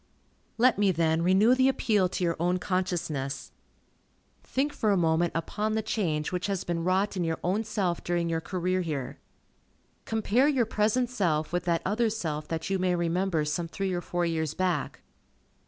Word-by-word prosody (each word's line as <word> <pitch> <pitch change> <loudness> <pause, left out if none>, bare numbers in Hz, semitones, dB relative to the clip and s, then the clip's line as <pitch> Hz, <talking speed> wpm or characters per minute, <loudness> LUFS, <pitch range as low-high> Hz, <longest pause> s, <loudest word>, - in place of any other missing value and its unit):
Let 245 -1 +4
me, 200 -2 +4
then, 160 -1 +1
renew 190 +7 +5
the 260 +1 +4
appeal 210 -8 +2
to 185 - -3
your 170 -1 +1
own 175 +2 +1
consciousness. 175 -7 -2 0.9
Think 285 +3 -1
for 215 - 0
a 200 - +3
moment 165 0 +2
upon 210 +6 -2
the 220 0 0
change 155 -10 -1
which 180 +1 -2
has 195 -3 -2
been 170 -1 -2
wrought 190 +3 +1
in 180 - -1
your 165 -1 -1
own 195 +5 +1
self 195 -6 -2
during 175 -1 0
your 165 -1 -1
career 185 +1 -1
here. 145 -7 -4 0.9
Compare 225 +4 +2
your 265 -6 +2
present 220 +3 +1
self 170 -10 0
with 175 -1 -1
that 170 -1 +1
other 220 +4 +1
self 155 -8 -3
that 160 -1 -3
you 195 -1 0
may 180 -1 +1
remember 170 -1 0
some 165 +3 -2
three 190 +2 -3
or 175 - -1
four 175 0 -1
years 160 -2 -1
back. 180 - -1
180 Hz, 180 wpm, -28 LUFS, 165-210 Hz, 0.9 s, renew